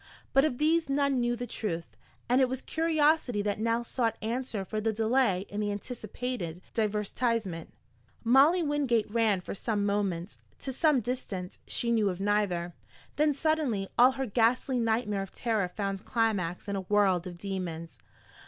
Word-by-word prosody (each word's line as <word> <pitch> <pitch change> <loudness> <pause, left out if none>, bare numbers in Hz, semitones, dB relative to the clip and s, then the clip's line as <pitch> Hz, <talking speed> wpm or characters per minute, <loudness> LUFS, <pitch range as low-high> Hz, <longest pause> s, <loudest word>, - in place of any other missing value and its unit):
But 270 +2 +5
of 255 -6 -1
these 320 +1 +2
none 280 -1 +2
knew 240 0 +1
the 245 +1 -4
truth, 175 -9 -4 0.3
and 250 +2 +4
it 260 - +3
was 260 0 -3
curiosity 310 -8 +2
that 205 0 -1
now 230 +1 +1
sought 230 -2 -1
answer 225 -2 -3
for 215 +3 -3
the 225 +1 +1
delay 220 -3 +2
in 205 - -5
the 205 -1 0
anticipated 215 -4 -5
divertisement. 210 -4 -1 0.5
Molly 280 +9 +5
Wingate 275 -8 +1
ran 220 -4 +2
for - - -6
some 205 0 -1
moments, 200 -3 -1 0.2
to 265 - -5
some 295 -1 +3
distance 205 -6 -4
she 235 - 0
knew 220 -3 +3
of 180 -1 -4
neither. 195 -4 0 0.4
Then 300 0 +4
suddenly 280 -9 0
all 250 +2 +6
her 265 0 -2
ghastly 245 +3 +2
nightmare 220 -3 0
of 195 - -6
terror 220 -5 0
found 195 +1 -4
climax 210 -7 -1
in 200 - -2
a 195 - -2
world 190 -2 +2
of 175 -1 -8
demons. 175 -4 -5
225 Hz, 160 wpm, -29 LUFS, 200-255 Hz, 0.5 s, all